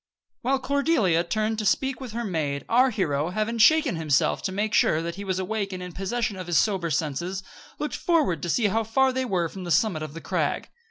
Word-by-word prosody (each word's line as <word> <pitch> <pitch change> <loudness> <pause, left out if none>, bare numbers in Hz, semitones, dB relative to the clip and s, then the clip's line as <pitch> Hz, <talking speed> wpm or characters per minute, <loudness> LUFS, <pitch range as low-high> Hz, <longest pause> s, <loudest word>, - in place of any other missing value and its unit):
While 270 +3 +1
Cordelia 265 - +2
turned 215 +4 -1
to - - -2
speak 265 +4 0
with 250 -5 -7
her 235 +1 -3
maid, 150 -7 -2
our 255 +3 +4
hero, 160 - -1
having 215 +4 -2
shaken 300 - +5
himself 150 -3 +1
to 190 - -2
make 205 +2 -2
sure 155 - +3
that 170 +1 -3
he 200 +3 -7
was 190 -2 -2
awake 200 +1 -2
and 180 0 -5
in 180 - -7
possession 205 +2 -2
of 185 -1 -7
his 175 - +2
sober 190 -6 +1
senses, 170 +5 -2 0.3
looked 300 - -3
forward 315 - +1
to 175 - -3
see 225 +6 +1
how 225 +3 +1
far 260 +4 +2
they 260 0 -1
were 180 -7 0
from 185 +3 -9
the 175 - -6
summit 175 -2 +2
of 155 -1 -6
the 165 - -7
crag. - - -1
200 Hz, 225 wpm, -25 LUFS, 170-235 Hz, 0.3 s, shaken